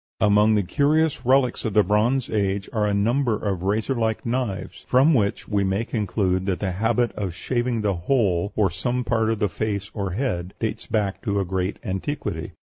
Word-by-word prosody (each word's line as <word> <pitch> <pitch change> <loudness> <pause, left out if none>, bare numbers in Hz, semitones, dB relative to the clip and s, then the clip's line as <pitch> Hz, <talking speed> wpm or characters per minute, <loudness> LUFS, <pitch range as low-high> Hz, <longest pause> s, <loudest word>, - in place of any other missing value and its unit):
Among 105 +1 +4
the 105 - +2
curious 145 - +1
relics 130 -2 +3
of 110 -3 -3
the 105 - +6
Bronze 115 +6 +1
Age 100 -2 -1
are 105 -2 +1
a - - +1
number 120 +3 +2
of 100 -5 -2
razor 105 +7 0
like 110 -3 -1
knives; 120 -5 -3
from 135 +6 +5
which 105 -6 0
we 100 -2 +1
may 95 +4 0
conclude 95 -4 -1
that 95 -2 0
the 95 -3 -1
habit 115 +5 +1
of 95 -5 -4
shaving 120 +1 -1
the 105 -2 +1
whole 100 -2 +1
or 100 -4 +2
some 120 +8 -2
part 110 -2 +1
of 115 - 0
the 105 - +1
face 100 +1 -3
or 100 -4 -3
head 95 -6 -2
dates 110 0 -3
back 100 -3 -1
to 100 -3 -1
a 100 - 0
great 95 +1 -2
antiquity. 105 +8 -4
105 Hz, 190 wpm, -23 LUFS, 100-120 Hz, -, the